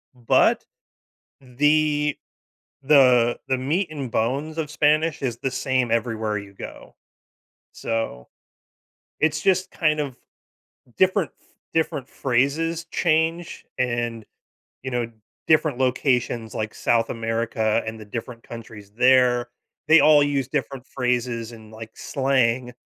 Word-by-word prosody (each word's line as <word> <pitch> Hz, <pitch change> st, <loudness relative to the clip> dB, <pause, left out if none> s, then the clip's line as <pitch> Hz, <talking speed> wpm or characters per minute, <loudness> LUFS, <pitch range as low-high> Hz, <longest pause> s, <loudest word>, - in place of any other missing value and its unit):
But, 120 Hz, -2 st, +2 dB, 0.8 s
the 150 Hz, +3 st, +1 dB, 0.7 s
the 125 Hz, -4 st, +5 dB
the 130 Hz, -1 st, +1 dB
meat 155 Hz, +9 st, 0 dB
and 140 Hz, -5 st, -5 dB
bones 140 Hz, +9 st, -1 dB
of 155 Hz, -2 st, -2 dB
Spanish 150 Hz, +1 st, +1 dB
is 120 Hz, -3 st, -2 dB
the 135 Hz, -, -2 dB
same 130 Hz, -3 st, 0 dB
everywhere 110 Hz, -2 st, -1 dB
you 100 Hz, 0 st, -11 dB
go. -, -, -10 dB, 0.8 s
So 115 Hz, -, -4 dB, 0.9 s
it's 155 Hz, 0 st, +1 dB
just 185 Hz, +1 st, +1 dB
kind 155 Hz, -2 st, +1 dB
of 140 Hz, -4 st, -3 dB, 0.8 s
different 190 Hz, -2 st, +2 dB
ph -, -, -32 dB, 0.3 s
different 160 Hz, -4 st, -1 dB
phrases 150 Hz, +6 st, 0 dB
change 165 Hz, 0 st, 0 dB
and, 120 Hz, -3 st, -2 dB, 0.6 s
you 130 Hz, -, -3 dB
know, 120 Hz, -2 st, -2 dB, 0.4 s
different 155 Hz, -4 st, +3 dB
locations 125 Hz, -3 st, 0 dB
like 110 Hz, 0 st, -3 dB
South 115 Hz, -1 st, +1 dB
America 115 Hz, -1 st, -1 dB
and 110 Hz, 0 st, -5 dB
the 110 Hz, -, -10 dB
different 115 Hz, +3 st, -7 dB
countries 110 Hz, -3 st, -11 dB
there, 125 Hz, -1 st, +4 dB, 0.4 s
they 160 Hz, +1 st, +7 dB
all 150 Hz, -1 st, +6 dB
use 140 Hz, -3 st, 0 dB
different 135 Hz, -1 st, -4 dB
phrases 125 Hz, -3 st, -2 dB
and, 110 Hz, -2 st, -13 dB
like, 110 Hz, 0 st, -9 dB
slang. 130 Hz, -2 st, 0 dB
130 Hz, 120 wpm, -23 LUFS, 115-150 Hz, 0.9 s, they